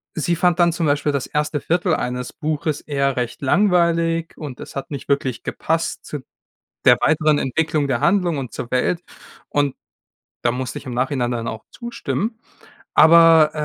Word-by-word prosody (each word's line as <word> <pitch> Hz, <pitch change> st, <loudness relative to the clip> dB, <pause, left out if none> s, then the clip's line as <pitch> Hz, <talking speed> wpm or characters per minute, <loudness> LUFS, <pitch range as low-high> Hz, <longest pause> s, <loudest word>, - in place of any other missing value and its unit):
sie 170 Hz, +2 st, 0 dB
fand 175 Hz, 0 st, +2 dB
dann 170 Hz, -1 st, +4 dB
zum 170 Hz, -1 st, -1 dB
Beispiel 145 Hz, 0 st, +1 dB
das 140 Hz, -2 st, -2 dB
1. 150 Hz, 0 st, -1 dB
Viertel 175 Hz, +1 st, +1 dB
eines 125 Hz, 0 st, -4 dB
Buches 155 Hz, -1 st, -2 dB
eher 140 Hz, -2 st, -1 dB
recht 120 Hz, +2 st, -3 dB
langweilig 170 Hz, 0 st, +2 dB
und 145 Hz, -5 st, -7 dB
es -, -, -10 dB
hat 135 Hz, +2 st, -5 dB
nicht 140 Hz, -, -6 dB
wirklich 135 Hz, -3 st, 0 dB
gepasst 165 Hz, +1 st, -2 dB
zu 150 Hz, -, -5 dB, 0.7 s
der -, -, +8 dB
weiteren 155 Hz, -1 st, +3 dB
Entwicklung 150 Hz, +2 st, 0 dB
der 125 Hz, -3 st, 0 dB
Handlung 180 Hz, -6 st, +2 dB
und 130 Hz, -3 st, -5 dB
zur 120 Hz, -, -6 dB
Welt, 145 Hz, +7 st, 0 dB, 0.5 s
und 145 Hz, -2 st, +1 dB, 0.7 s
da 120 Hz, -, +3 dB
musste 125 Hz, 0 st, -4 dB
ich -, -, -10 dB
im 125 Hz, -, -5 dB
Nachhinein 125 Hz, -1 st, 0 dB
dann 115 Hz, -1 st, -3 dB
auch 110 Hz, -1 st, -5 dB
zustimmen. 235 Hz, -2 st, -4 dB, 0.6 s
Aber, 160 Hz, 0 st, +7 dB
150 Hz, 165 wpm, -21 LUFS, 130-165 Hz, 0.7 s, der